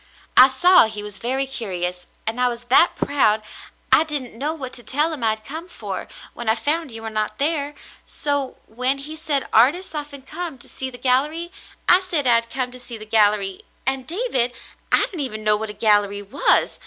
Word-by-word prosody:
I 255 - +11
saw 350 +3 +5
he 210 -1 -6
was 210 -1 -8
very 265 +3 -1
curious, 180 -8 -4 0.2
and 225 +3 -2
I 250 - +4
was 240 -1 -4
that 305 +7 +5
proud 220 -7 +2 0.5
I - - +7
didn't 290 -6 -4
know 280 +7 -2
what 270 -6 -6
to 245 - -6
tell 295 +8 +1
him 280 -6 -3
I 225 - +4
had 215 0 -3
come 320 +7 -7
for, - - -6 0.3
when 235 -2 -4
I 220 - +4
found 310 +5 -1
you 225 -1 -9
were 225 - -5
not 215 0 -2
there, 290 0 -1 0.3
so 285 -2 -1
when 255 +4 0
he 295 +3 -8
said 295 -4 -1
artists 290 +13 +3
often 290 -3 -6
came 325 0 -5
to 240 - -14
see 265 - -5
the 250 - -10
gallery, 300 +7 +1 0.4
I 360 - +7
said 350 -7 -2
I 245 - +5
had 230 0 +1
come 255 0 -3
to 250 - -11
see 240 -2 -9
the 215 - -10
gallery; 205 -3 +2 0.2
and 265 0 -2
David, 320 - -1 0.4
I - - +5
didn't 355 - -9
even 215 -6 -4
know 210 0 +3
what 220 +1 -4
a - - -6
gallery 205 -1 +2
was. 250 +9 +2
255 Hz, 210 wpm, -22 LUFS, 220-295 Hz, 0.5 s, I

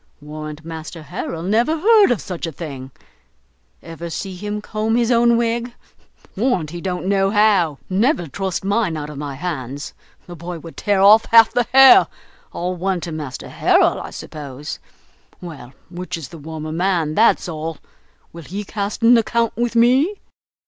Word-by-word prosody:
Warrant 155 +1 -8
Master 160 0 -8
Harrel 160 +2 -5
never 235 - +1
heard 430 +3 +5
of 245 -5 0
such 175 -2 -5
a - - -5
thing; 135 -5 -8 0.9
ever 165 +1 -8
see 185 +3 -5
him 210 +3 -4
comb 215 +1 -2
his 240 0 +1
own 235 0 +4
wig? 235 +1 -1 0.6
Warrant 190 - 0
he 175 0 -7
don't 180 -1 -3
know 195 0 +2
how! 200 -8 +3
never 200 - +1
trust 190 +4 -4
mine 200 -5 0
out 150 0 -6
of 145 - -8
my 145 -2 -5
hands, 145 -3 -5 0.3
the 175 - -10
boy 170 +1 -7
would 165 0 -11
tear 200 -2 0
off 215 +3 +7
half 225 -1 +6
the 245 -1 +1
hair; 270 0 +8 0.4
all 180 +1 -3
one 185 +1 -1
to 170 - -5
master 150 -5 -6
Harrel, - - +2
I - - -7
suppose. 145 -2 -8 0.6
Well, 150 -9 -10 0.2
which 180 0 -5
is 155 -5 -8
the 165 - -11
warmer 155 +1 -7
man, 170 -2 0
that's 220 +1 +3
all? 160 -1 -5 0.6
Will 170 - -9
he 195 +7 -6
cast 205 +1 -4
an 235 +2 +7
account 230 +1 0
with 235 +1 -2
me?" 260 - +3
180 Hz, 170 wpm, -20 LUFS, 160-225 Hz, 0.9 s, hair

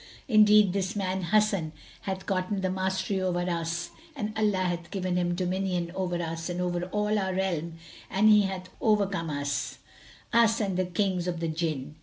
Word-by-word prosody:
Indeed 210 -4 +6
this 195 +1 -1
man 190 -2 -1
Hasan 200 -5 +2 0.3
hath 190 -1 -4
gotten 190 +1 -1
the 185 -1 0
mastery 190 +1 -1
over 180 -1 0
us 170 0 -2 0.2
and 215 -5 -4
Allah 210 -3 +1
hath 175 -1 -2
given 185 -2 -2
him 175 -1 +1
dominion 180 -1 -1
over 185 -2 -2
us 165 0 -4
and 175 0 -3
over 175 -1 -1
all 210 +3 0
our 190 -1 -1
realm 170 -4 -1 0.3
and 205 +3 +3
he 210 -1 +7
hath 185 -1 -6
overcome 200 -6 +1
us, 145 -1 -2 0.6
us 230 -1 +4
and 195 -4 -1
the 185 0 +1
Kings 180 -1 -1
of 175 -2 -2
the 165 - -1
Jinn." 155 -3 -3
185 Hz, 175 wpm, -28 LUFS, 175-200 Hz, 0.6 s, he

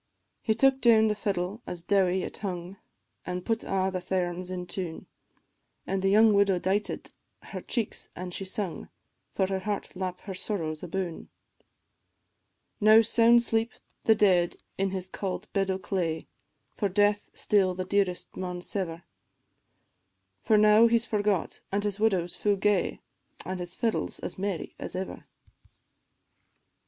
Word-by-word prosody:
He 220 - +1
took 270 +3 +3
down 220 -2 +6
the - - +2
fiddle 200 0 -2
as 175 -2 -6
dowie 190 -1 +2
it - - -6
hung, 185 -1 -5 0.5
An' 180 0 -4
put 225 +2 -1
a' 190 0 0
the 185 - -1
thairms 180 -1 -2
in 180 -1 -4
tune, 175 -3 -5 0.8
The 195 0 0
young 215 +2 +6
widow 200 -2 +4
dighted 190 +4 -1 0.3
her - - -7
cheeks 235 -4 -3
an' 180 0 -6
she 195 - -3
sung, 190 -1 -4 0.5
For 190 - +2
her 190 0 -1
heart 205 +1 -4
lap 185 -1 -4
her 195 - -6
sorrows 170 -5 -3
aboon. 180 -1 -4 1.5
Now 215 +1 +7
sound 235 +1 +5
sleep 225 0 0 0.3
the 220 - +6
dead 185 -5 +3 0.2
in 195 0 0
his 185 -1 -4
cauld 190 0 -4
bed 195 -1 +1
o' 190 - +1
clay, 175 -4 -2 0.5
For 205 - 0
death 205 +2 +2
still 190 -3 +2
the 185 0 -3
dearest 195 -2 0
maun 180 -1 -4
sever; 175 -4 -3 1.4
For 215 - +4
now 215 +2 +7
he 235 0 +4
's 230 - -2
forgot, 205 -4 0
an' 200 +1 0
his 205 -1 -2
widow's 190 -6 +1
fu' 205 -1 +1
gay, 200 -1 +1 0.4
An' 185 +1 -4
his 175 0 -6
fiddle 230 -3 0
's - - -8
as - - -6
merry 195 -3 -3
as - - -6
ever. 190 +1 -5
195 Hz, 150 wpm, -28 LUFS, 180-210 Hz, 1.5 s, Now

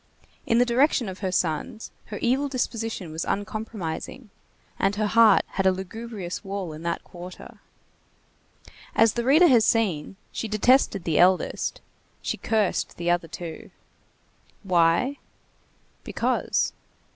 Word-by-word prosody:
In 230 - +3
the 245 - +5
direction 245 0 +2
of 190 -1 -7
her 190 -2 -2
sons 180 +5 -2
her 210 - -7
evil 265 +4 +2
disposition 225 - -3
was 160 +2 -3
uncompromising, 210 +1 -4 0.5
and 195 +1 +1
her 215 +1 0
heart 225 +1 +5
had 195 -1 0
a - - +6
lugubrious 190 0 -6
wall 195 -4 -4
in 155 - -9
that 170 0 -3
quarter. 180 +1 -11 1.4
As 225 -1 +5
the 235 - -2
reader 295 +8 +6
has 245 -9 +6
seen, 195 -9 +1 0.2
she 225 - -4
detested 215 -2 +3
the 160 -3 +1
eldest; 185 +1 +2 0.4
she - - -2
cursed 215 -4 0
the 175 0 0
other 175 -1 0
two. 165 0 -8 0.9
Why? 180 +9 +2 0.9
Because. - - 0
205 Hz, 130 wpm, -25 LUFS, 175-230 Hz, 1.4 s, a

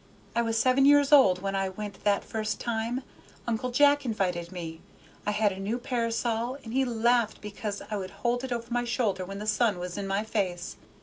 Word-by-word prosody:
I 235 - +3
was 225 -1 0
seven 255 +3 +4
years 285 0 +5
old 195 -11 +6
when 195 0 -1
I 195 0 0
went 200 +1 -7
that 205 -1 +3
first 215 -1 -3
time. 235 +2 -2 0.4
Uncle 235 +1 -1
Jack 285 +3 +4
invited 180 -7 -1
me. 165 -3 -7 0.5
I - - +3
had 210 0 +2
a 190 - -7
new 205 +5 -1
parasol, 235 0 -1
and 225 - -7
he 265 +1 +3
laughed 235 -2 +1
because 210 0 -5
I 210 - 0
would 190 -1 -5 0.2
hold 245 +1 +1
it 260 - -5
over 235 -1 -2
my 245 0 +1
shoulder 220 -6 0
when 195 +2 -7
the 210 - -5
sun 215 -1 +2
was 180 +2 -5
in 195 - -3
my 195 +2 0
face. 185 -5 -2
220 Hz, 205 wpm, -28 LUFS, 195-240 Hz, 0.5 s, old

